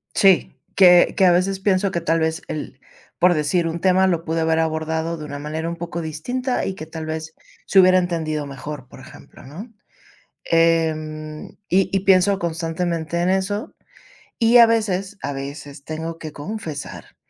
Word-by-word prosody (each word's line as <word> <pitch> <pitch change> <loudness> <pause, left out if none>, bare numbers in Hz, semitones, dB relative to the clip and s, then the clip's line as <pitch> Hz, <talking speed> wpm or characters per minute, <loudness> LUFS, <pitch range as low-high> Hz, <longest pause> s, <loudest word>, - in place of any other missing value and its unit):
Sí, 195 -3 +3 0.2
que 180 -2 +6
que 190 - +4
a 180 - +6
veces 190 +2 +1
pienso 190 0 +1
que 170 - -2
tal 165 0 +1
vez 160 +1 -1
el 155 - -6 0.4
por 180 0 +5
decir 160 +3 0
un 165 +1 -4
tema 190 0 +3
lo 170 -3 0
pude 165 0 -2
haber 160 0 +1
abordado 160 +1 -2
de 155 - -7
una 145 -1 -7
manera 155 +2 -4
un 170 - -4
poco 170 0 -5
distinta 245 - -3
y 195 - -2
que 155 - -8
tal 160 0 -7
vez 160 0 -6 0.3
se 195 - +4
hubiera 185 0 +6
entendido 160 -4 -2
mejor, 140 -1 -8
por - - -14
ejemplo, - - -15
¿no?, 190 - -10 0.7
em, 155 -2 0 0.2
y 190 +1 +2
y 195 - +1
pienso 195 +1 +3
constantemente 170 0 -2
en 180 - +1
eso. 190 +3 -1 0.7
Y 230 +1 +5
a 235 - +9
veces, 205 -3 -1
a 145 - -3
veces 140 0 -8
tengo 160 +1 -5
que 155 -2 -8
confesar 160 -1 -7
165 Hz, 175 wpm, -21 LUFS, 155-185 Hz, 0.7 s, a